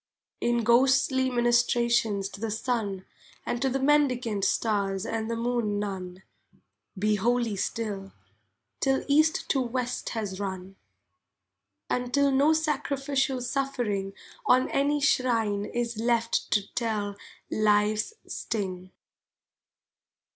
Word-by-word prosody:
In 240 -1 +1
ghostly 260 +2 +3
ministrations 235 -4 +2
to 200 +1 -11
the 225 - -1
sun, 215 -4 -2 0.4
And 240 - -2
to 270 - +2
the 265 - 0
mendicant 255 -7 +2
stars 200 -3 0
and 225 -1 -3
the 230 - -1
moon 230 -3 -1
nun, 190 -2 -5 0.7
Be 210 +2 +2
holy 235 +1 +1
still, 195 -1 -3 0.7
till 270 0 +1
East 310 +5 +3
to 270 - +2
West 250 0 -2
has 200 -3 -3
run, 190 -1 -5 1.1
And 250 0 -2
till 280 +1 +3
no 280 +3 +4
sacrificial 280 -3 0
suffering 245 -7 -2 0.3
On 255 +1 +4
any 285 +1 +2
shrine 225 -7 +1
is 235 -1 -3
left 230 0 +1
to 205 -2 +1
tell 210 -4 -2 0.4
life's 210 - +2
sting. 185 -4 -4
235 Hz, 110 wpm, -27 LUFS, 205-260 Hz, 1.1 s, no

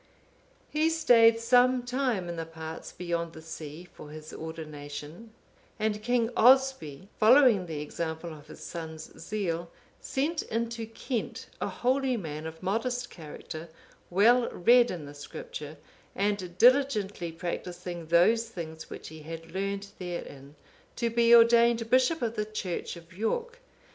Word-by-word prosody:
(495) 305 - -1
He 325 - +5
stayed 230 -8 +5
some 250 +2 +4
time 245 -7 -1
in 170 - -4
the 165 - -3
parts 160 0 -8
beyond 170 -1 -3
the 160 - -10
sea 160 0 -8
for 150 - -11
his 155 0 -10
ordination, 155 +4 -8 0.5
and 215 -1 -1
King 240 0 +1
Oswy, 245 - +4
following 225 -4 +6
the 155 -3 -4
example 160 +2 -4
of 150 -1 -13
his - - -12
son's 160 -2 -7
zeal, 170 -3 -3 0.3
sent 305 +4 -1
into 230 0 -3
Kent 225 +1 -4
a - - 0
holy 260 0 +1
man, 155 -5 -5
of 160 +2 -10
modest 245 +5 -1
character, 160 0 -9 0.4
well 235 +7 +4
read 240 +6 +5
in 165 -5 -5
the 145 - -10
Scripture, 145 +1 -8 0.4
and 195 -3 -1
diligently 220 -9 +3
practising 175 0 -5
those 225 +8 +4
things 160 -6 -8
which - - -8
he 160 0 -10
had 165 +1 -8
learned 200 +1 -3
therein, 150 -6 -7 0.4
to 235 -1 -1
be 235 0 +3
ordained 235 0 +5
bishop 260 +4 +3
of 230 -1 -1
the 210 - 0
church 210 -6 -4
of 170 +1 -14
York. 470 - -2
195 Hz, 145 wpm, -29 LUFS, 165-235 Hz, 0.5 s, following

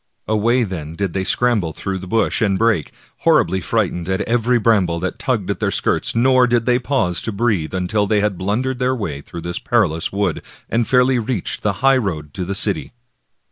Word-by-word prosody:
Away, 115 +4 +2
then, 85 -6 -5
did 100 -1 -2
they 95 - -1
scramble 105 -7 +1
through 95 +3 -4
bush 95 +6 0
and 100 -3 +2
brake, 110 -9 +1 0.3
horribly 95 +2 +2
frightened 90 -3 -1
at 95 +1 0
every 120 +1 +1
bram 110 -5 +3
ble 85 0 -2
that 95 - -3
tugged 110 -8 -1
at 100 - -4
their - - 0
skirts, - - 0
nor 130 +1 +4
did 120 -1 +1
they 125 -1 +3
pause 120 -10 0
to 115 - -3
breathe 100 -6 -1
until 100 +3 0
they 105 0 +2
had 105 -1 0
blundered 120 +8 -2
their 130 0 +1
way 85 - -4
through 85 +3 -9
this 85 +1 -4
perilous 95 -10 0
wood, 100 +1 -1 0.3
and 115 0 0
fairly 125 0 +3
reached 115 -4 -3
the 105 - 0
highroad 95 - +1
to 90 - -4
the 100 +2 -3
city. 100 +4 +1
105 Hz, 195 wpm, -19 LUFS, 90-120 Hz, 0.3 s, nor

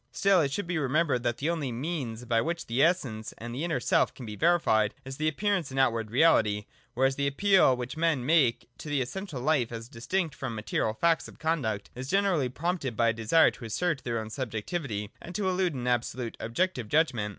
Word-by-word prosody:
Still 195 -3 +3
it 140 -3 0
should 205 +7 -2
be 175 -2 -1
remembered 145 -1 +1
that 120 -1 -1
the 155 +4 0
only 150 -7 -2
means 125 -3 -4
by 115 -1 +2
which 170 +4 -3
the 120 +3 0
Essence 130 -11 0
and 120 +1 -7
the 135 +6 -3
inner 170 -1 0
self - - +2
can 125 - -9
be 105 -1 -6
verified, 110 -10 +2
is 135 0 -7
their 155 +1 +1
appearance 180 -2 -1
in 135 - -6
outward 115 -5 +2
reality; 110 -6 +3 0.3
whereas 135 +2 +2
the 140 0 +1
appeal 185 -2 +4
which 125 +3 -5
men 160 -6 +1
make 130 -6 +3
to 150 - -7
the 145 -1 +1
essential 175 +1 -6
life, 130 -3 +1
as 115 0 -6
distinct 160 +8 -2
from 130 -3 -5
the - - -6
material 110 +1 -1
facts 165 +5 +2
of - - -14
conduct, 145 -11 -2
is 130 +2 -7
generally 190 -8 +2
prompted 145 - -3
by 115 -1 +4
a - - +1
desire 115 +9 +4
to 120 - -11
assert 150 +5 -1
their 120 -2 -2
own 110 0 -5
subjectivity 110 - -4
and 180 - -9
to 200 -1 0
elude 180 -3 0
an 125 -1 -4
absolute 120 -1 -1
and - - -4
objective 125 - -1
judgment. 130 -9 +2
135 Hz, 215 wpm, -28 LUFS, 115-165 Hz, 0.3 s, appeal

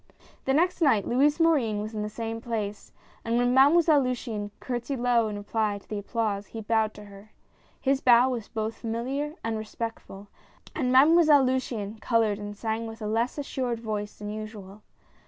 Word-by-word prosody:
The 265 - +2
next 355 +3 +1
night 230 - +3
Louis 285 +6 +2
Morin 275 -11 +2
was 215 +2 -5
in 215 - -3
the 210 - -3
same 225 +1 -5
place, 215 -4 -4 0.3
and 230 +1 0
when 245 0 +2
Mademoiselle 295 +3 +5
Luciane 235 -5 -3
curtsied 250 +2 -3
low 240 -2 +2
in 210 -1 -4
reply 205 0 -1
to 200 - -16
the 210 - -4
applause, 205 -1 -2
he 225 - -7
bowed 220 0 0
to 210 - -11
her. 200 +1 -15 0.5
His 270 0 +1
bow 245 0 +6
was 240 -4 -4
both 220 0 -3
familiar 260 +6 -3
and 225 -1 -2
respectful, 215 -2 -7 0.5
and 255 -5 0
Mademoiselle 295 +1 +6
Luciane 225 -5 -2
col 230 -2 +2
ored 210 -2 0
and 205 0 -7
sang 225 +1 -2
with 225 0 -9
a - - -3
less 230 +5 -1
assured 255 -4 -3
voice 210 -2 -4
than 210 0 -6
usual. 215 -2 -8
225 Hz, 180 wpm, -27 LUFS, 210-255 Hz, 0.5 s, bow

